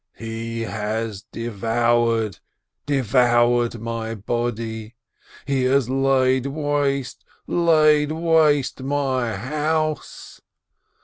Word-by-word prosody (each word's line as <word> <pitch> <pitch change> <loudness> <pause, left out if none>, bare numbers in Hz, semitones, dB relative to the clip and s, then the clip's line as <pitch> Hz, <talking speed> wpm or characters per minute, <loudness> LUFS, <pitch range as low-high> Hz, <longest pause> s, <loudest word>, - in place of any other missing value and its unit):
'He 115 0 -5
has 110 -1 -3
devoured, 115 -1 0 0.5
devoured 120 -2 +2
my 115 0 -4
body, 115 +1 -4 0.5
he 135 -2 0
has 130 -1 +2
laid 130 -1 +2
waste, 140 -2 -1 0.2
laid 155 -3 +3
waste 155 -5 +2
my 130 -4 -1
house 155 +6 -3
120 Hz, 75 wpm, -22 LUFS, 115-145 Hz, 0.5 s, laid